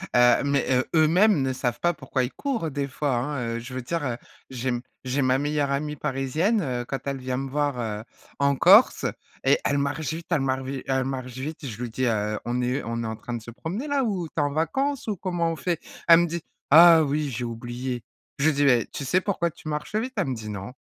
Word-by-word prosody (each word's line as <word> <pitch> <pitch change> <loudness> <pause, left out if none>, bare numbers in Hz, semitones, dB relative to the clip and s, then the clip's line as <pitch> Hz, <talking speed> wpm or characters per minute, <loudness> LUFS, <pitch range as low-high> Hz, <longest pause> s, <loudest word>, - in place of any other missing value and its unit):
heu, 120 +2 +5
mais, 140 -1 +1
heu, 130 0 +3
eux-mêmes 165 +2 +5
ne 130 -1 0
savent 125 -2 -2
pas 175 0 +2
pourquoi 130 -4 -2
ils 125 - -3
courent 235 - -2
des 140 0 -2
fois, 140 0 -1
hein. 120 -2 -2
Je 120 +2 -9
veux 130 - -3
dire, 165 +5 -3
heu, 120 -2 -2 0.3
j'ai 130 0 -3
m 120 -1 -1 0.2
j'ai 130 +2 0
ma 130 +1 +3
meilleure 145 -1 0
amie 150 +2 -1
parisienne, 150 - 0
heu, 125 -6 -2
quand 135 0 -3
elle 140 -1 -1
vient 130 0 -3
me 135 0 -3
voir, 145 -2 -1
heu, 110 -2 -3 0.4
en 140 0 +3
Corse. 195 - +6 0.4
Et - - +4
elle 140 - +2
marche 145 +1 -2
vite, 165 +1 -7
elle 165 -5 +2
marche 130 0 0
vite, 135 0 -5
elle 130 -1 +1
marche 130 -2 -4
vite. 140 +4 -6
Je 120 -2 -6
lui 120 - -3
dis: 130 +3 -1
«Heu, 105 -2 0
on 120 +1 -1
est 125 +3 -1
on 115 0 -3
est - - -3
en 110 - -3
train 120 - -7
de 120 - -4
se 115 - -11
promener 185 - -5
là, 285 -2 +1
ou 190 -8 -1
tu - - -23
es - - +3
en 145 -1 0
vacances, 265 - -1
ou 215 - 0
comment 175 -2 -1
on - - -3
fait?» 170 +2 -2 0.3
elle 165 -1 +9
me 175 - +2
dit: 170 +1 -4 0.3
«Ah 165 +1 +9
oui, 150 0 -1
j'ai 120 +1 -3
oublié», 120 +1 -5 0.3
je 140 - 0
lui - - +1
dis: 145 - +2
«Mais 125 -5 +4
tu - - -4
sais 160 +7 +2
pourquoi 180 -3 0
tu 155 - -13
marches 150 +6 -4
vite?» 250 +4 -1
elle 190 -8 +1
me 130 - -1
dit: 110 -2 -7
«Non», 100 +3 -6
140 Hz, 250 wpm, -25 LUFS, 125-160 Hz, 0.4 s, elle